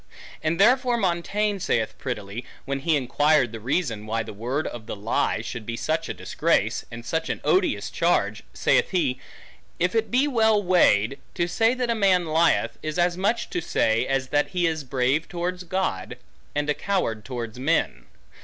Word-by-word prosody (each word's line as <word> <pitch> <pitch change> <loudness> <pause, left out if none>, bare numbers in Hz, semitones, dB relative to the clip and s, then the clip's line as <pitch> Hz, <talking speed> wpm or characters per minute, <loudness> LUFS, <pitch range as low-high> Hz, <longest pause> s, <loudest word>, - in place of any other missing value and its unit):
And 165 +3 -1
therefore 245 +3 +4
Montaigne 200 +2 0
saith 115 -10 0
prettily, 110 -2 -5 0.2
when 140 0 -2
he 160 +3 +1
inquired 140 -1 +2
the 115 - -7
reason, 115 -3 -2
why 115 +1 -1
the - - -8
word 125 +8 -2
of 110 -2 -6
the - - -4
lie 105 +1 0
should 120 -1 -6
be 115 +2 -5
such 160 +5 -1
a - - -2
disgrace, - - 0
and 115 0 -9
such 160 +5 -2
an - - -2
odious 375 -1 +1
charge? - - +1
Saith - - +2
he, 145 -9 0 0.6
If 180 +1 +1
it 225 -1 +1
be 260 +4 +3
well 220 -5 +3
weighed, 140 - +3 0.2
to 175 -2 0
say 225 +7 +2
that 250 -2 -1
a - - +3
man 190 -5 +3
lieth, 165 +1 +2
is 155 +1 -4
as 175 0 +2
much 205 +6 -1
to 355 - -1
say, 115 - +1
as 135 -1 -1
that 145 +1 +2
he 180 -2 0
is 160 -2 -1
brave 130 +4 0
towards 180 +1 -4
God, 170 - -2 0.4
and 145 0 0
a 150 - +2
coward 145 - -1
towards 120 -2 -6
men. 155 +5 0
155 Hz, 180 wpm, -25 LUFS, 120-185 Hz, 0.6 s, therefore